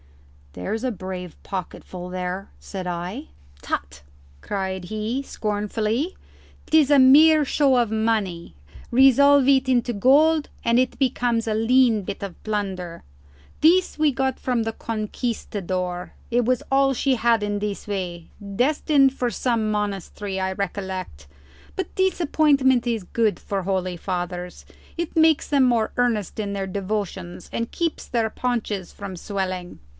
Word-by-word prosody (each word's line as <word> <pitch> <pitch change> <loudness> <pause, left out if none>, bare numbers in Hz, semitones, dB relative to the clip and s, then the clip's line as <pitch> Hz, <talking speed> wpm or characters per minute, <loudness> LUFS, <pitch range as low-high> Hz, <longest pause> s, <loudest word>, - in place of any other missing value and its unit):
"There's 155 - -4
a 255 - 0
brave 185 -3 -7
pocketful 180 -1 -6
there," 185 +1 -4
said 190 -2 -7
I. 180 - -4 0.3
"Tut!" 70 +1 -4 0.4
cried 190 -2 -3
he, 215 +6 -3
scornfully. 215 - -2 0.5
"'Tis 310 -3 +4
a 285 - +7
mere 300 +4 +7
show 275 -1 +3
of 240 -3 +2
money; 215 - -1 0.3
resolve 270 +2 +6
it 265 -1 +4
into 245 -1 +2
gold 295 +8 +4 0.2
and 235 0 +3
it 255 0 +1
becomes 245 -3 +1
a 220 - +1
lean 230 0 +3
bit 195 - -6
of 195 -3 -7
plunder. 190 -5 -4 0.6
This 355 +2 +4
we 305 -1 +3
got 265 -1 -1
from 245 -3 0
the 225 0 -3
Conquistador; 200 -6 -4 0.2
it 240 +1 +3
was 250 +1 +1
all 270 0 +3
she 265 +1 +1
had 230 -2 +2
in 205 0 -1
this 205 0 -4
way; 180 -4 -4 0.3
destined 275 0 +3
for 250 -2 -1
some 230 0 0
monastery, 205 -1 -3
I 190 0 -1
recollect; 190 - -5 0.5
but 380 - -3
disappointment 295 -9 +3
is 230 -4 -1
good 220 +3 0
for 195 -1 -3
holy 185 -1 -1
fathers; 180 0 -5 0.3
it 340 -1 -3
makes 320 -2 +4
them 280 -2 +3
more 235 -3 +2
earnest 225 -5 0
in 200 -1 -3
their 195 -1 -3
devotions 190 -2 -4
and 230 0 -2
keeps 335 -2 -2
their 230 -3 0
paunches 220 -7 -2
from 200 -2 -7
swelling." 185 -1 -4
220 Hz, 140 wpm, -23 LUFS, 190-260 Hz, 0.6 s, a